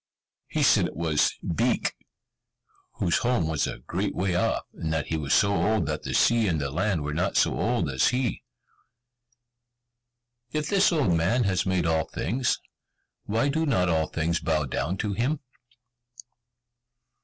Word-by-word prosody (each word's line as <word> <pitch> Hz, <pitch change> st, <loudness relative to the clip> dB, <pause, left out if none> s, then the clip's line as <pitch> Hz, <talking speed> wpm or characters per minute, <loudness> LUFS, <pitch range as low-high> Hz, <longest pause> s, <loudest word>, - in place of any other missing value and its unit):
He -, -, -1 dB
said -, -, +4 dB
it -, -, -10 dB
was 80 Hz, -2 st, +1 dB, 0.2 s
Beek, -, -, +1 dB, 1.0 s
whose 85 Hz, -, 0 dB
home 120 Hz, -9 st, +1 dB
was 80 Hz, -2 st, 0 dB
a -, -, -5 dB
great 95 Hz, +6 st, -2 dB
way 95 Hz, 0 st, 0 dB
off, 90 Hz, -, 0 dB
and 80 Hz, -, -4 dB
that 80 Hz, -2 st, -1 dB
he 80 Hz, -, -1 dB
was 75 Hz, -3 st, -3 dB
so 100 Hz, 0 st, +4 dB
old 100 Hz, +1 st, +1 dB
that 75 Hz, +1 st, -3 dB
the -, -, -4 dB
sea 115 Hz, -2 st, +3 dB
and 80 Hz, -4 st, 0 dB
the 70 Hz, -1 st, -3 dB
land 90 Hz, 0 st, 0 dB
were 75 Hz, +1 st, -3 dB
not 90 Hz, +5 st, 0 dB
so -, -, +3 dB
old 115 Hz, -8 st, 0 dB
as 65 Hz, -2 st, +2 dB
he. 125 Hz, -2 st, -1 dB, 2.1 s
"If 150 Hz, -1 st, -2 dB
this 195 Hz, -1 st, +4 dB
old 145 Hz, -, +2 dB
man 90 Hz, +10 st, +2 dB
has 95 Hz, -3 st, 0 dB
made 95 Hz, -2 st, +1 dB
all 80 Hz, -1 st, +1 dB
things, 125 Hz, +6 st, -1 dB, 0.7 s
why 115 Hz, +7 st, +1 dB
do 160 Hz, +3 st, 0 dB
not 90 Hz, -10 st, +2 dB
all 80 Hz, -1 st, +1 dB
things 85 Hz, +1 st, -1 dB
bow 80 Hz, -2 st, 0 dB
down 75 Hz, +7 st, -2 dB
to 105 Hz, 0 st, -2 dB
him?" 130 Hz, +8 st, 0 dB
90 Hz, 165 wpm, -26 LUFS, 80-115 Hz, 2.1 s, said